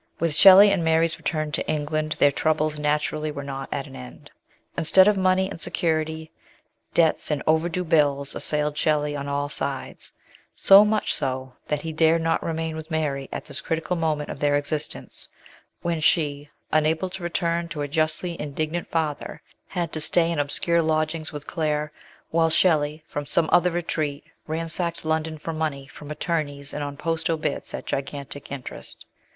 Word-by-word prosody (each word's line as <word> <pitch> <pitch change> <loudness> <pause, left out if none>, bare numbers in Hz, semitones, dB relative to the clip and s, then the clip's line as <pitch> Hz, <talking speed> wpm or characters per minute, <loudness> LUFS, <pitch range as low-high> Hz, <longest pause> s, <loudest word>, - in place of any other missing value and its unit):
With 165 -2 +1
Shelley 195 +5 +9
and 190 -4 +1
Mary's 160 0 +2
return 155 -2 -2
to - - -2
England 155 0 -1
their 145 - +5
troubles 155 0 0
naturally 150 +1 0
were 140 -1 -5
not 135 -1 -6
at - - -2
an - - -12
end. 65 -1 -11 0.4
Instead 190 +4 +5
of 210 - +4
money 190 0 +2
and 165 - -8
security, 160 -1 -1 0.6
debts 165 -2 +3
and 150 -3 -1
overdue 165 +3 +1
bills 145 -4 +2
assailed 150 -1 0
Shelley 150 -1 +1
on 140 0 -4
all 140 0 -1
sides; 140 -2 -4 0.4
so 195 +1 +8
much 210 0 +1
so, 130 -1 -3
that 150 -1 -1
he 160 -1 -4
dared 160 +1 +3
not 165 - +1
remain 160 -1 -3
with 160 0 -7
Mary 145 -4 -2
at - - -5
this 140 +3 -6
critical 165 +3 -2
moment 155 -3 -1
of - - -8
their 145 -1 +2
existence, 145 +1 -4 0.6
when 170 -1 -1
she, 145 -3 +1 0.2
unable 160 +4 +1
to 190 - -7
return 170 -1 -1
to 160 -3 -5
her 145 - -2
justly 160 +3 0
indignant 155 +3 -3
father, 155 -3 -2 0.3
had 175 -4 -3
to 155 - -3
stay 170 +2 +2
in 165 - -1
obscure 170 +4 +2
lodgings 155 0 -1
with 150 -1 -7
Claire, 150 -2 -1 0.4
while 165 0 +3
Shelley, 155 -2 +2
from 145 -2 -5
some 165 +2 +2
other 180 0 +5
retreat, 155 -4 -2 0.2
ransacked 165 +1 -2
London 160 0 -1
for 165 +2 -5
money 155 -4 -2
from 145 +1 -12
attorneys 150 -2 -2
and 150 - -3
on 145 0 -5
post 165 +1 -2
obits 155 -3 -2
at - - -7
gigantic 140 +1 -5
interest. 135 -3 -8
155 Hz, 170 wpm, -24 LUFS, 145-165 Hz, 0.6 s, Shelley